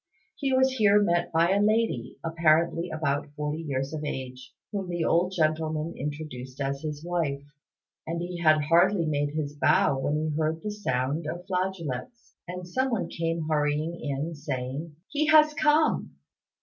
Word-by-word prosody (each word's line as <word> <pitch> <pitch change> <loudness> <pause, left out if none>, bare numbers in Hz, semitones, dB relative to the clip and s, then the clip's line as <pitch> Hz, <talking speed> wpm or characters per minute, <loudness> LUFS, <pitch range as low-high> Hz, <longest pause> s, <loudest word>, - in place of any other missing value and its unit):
He 275 -2 -1
was 260 0 +4
here 210 -2 +5
met 175 -4 +1
by 170 +2 +3
a 200 +1 +3
lady, 215 - +1
apparently 165 +1 +2
about 150 -2 -1
forty 150 +1 -3
years 135 -2 -3
of 155 -1 -4
age, 130 -3 -6 0.2
whom 195 -3 -3
the 175 -2 -1
old 180 +2 +2
gentleman 155 -1 0
introduced 135 -3 -6
as 140 0 -2
his 150 0 -5
wife; 160 -6 -1 0.6
and 165 +1 -2
he 175 0 -4
had 155 -2 +4
hardly 170 +3 +4
made 145 -1 -1
his 150 -2 -2
bow 140 -2 +3
when 145 +2 0
he 155 0 -1
heard 160 +1 -1
the 210 - -2
sound 145 -5 -1
of 175 +3 -5
flageolets, 185 - -4
and 180 0 -6
someone 255 +2 -1
came 165 -1 -2
hurrying 150 +1 0
in, 145 +3 -3
saying, 145 +1 -5
"He 300 +1 0
has 305 -1 +6
come!" 310 +1 +2
160 Hz, 160 wpm, -27 LUFS, 145-180 Hz, 0.6 s, has